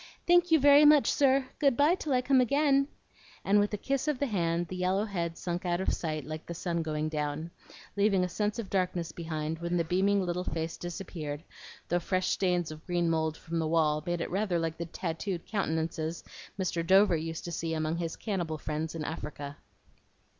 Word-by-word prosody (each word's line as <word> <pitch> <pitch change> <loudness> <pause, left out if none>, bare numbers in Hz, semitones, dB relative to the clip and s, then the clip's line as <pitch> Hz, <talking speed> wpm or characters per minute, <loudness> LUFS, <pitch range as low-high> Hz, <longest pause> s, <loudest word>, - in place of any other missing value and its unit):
Thank 350 0 +5
you 320 -1 +5
very 285 +1 +7
much, 295 -1 +6
sir. 270 -1 +3
Good 275 -5 +3
by 295 +4 +5
till 315 -5 -3
I 250 0 +2
come 260 0 +4
again;" 275 +1 +3 0.6
and 205 +1 +4
with 205 0 +1
a 210 - -2
kiss 275 +7 -1
of 300 -3 +1
the 285 - 0
hand, 175 -6 0
the 185 - -6
yellow 185 +3 +1
head 170 -5 -3
sunk 175 0 -3
out 175 -1 0
of 190 - 0
sight 155 -4 -3
like 155 +1 -7
the 170 - -5
sun 170 0 -2
going 155 -1 -2
down, 155 +1 -3 0.4
leaving 200 -2 +3
a - - +1
sense 210 +4 -2
of 225 -5 -5
darkness 180 -3 0
behind 160 -1 -4
when 170 +1 -1
the 170 - +2
beaming 190 +3 +2
little 175 +1 -2
face 165 -2 -3
disappeared, 165 -4 -6 0.4
though 175 - +1
fresh 185 +1 0
stains 180 -4 +1
of 155 +1 -10
green 175 -2 +1
mould 160 -1 0
from 165 0 -4
the 160 - 0
wall 155 -2 +2
made 175 0 -2
it - - -3
rather 195 -1 0
like 165 -1 -2
the 170 - -3
tattooed 170 +2 -4
countenances 165 -4 -2 0.4
Mr. 175 -3 -1
Dover 190 +1 +5
used 160 0 -4
to 175 - -5
see 165 -1 -2
among 155 +1 -1
his 165 -1 -3
cannibal 175 -7 -3
friends 155 +1 -4
in 160 - -3
Africa. 145 -2 -6
175 Hz, 205 wpm, -30 LUFS, 160-205 Hz, 0.6 s, very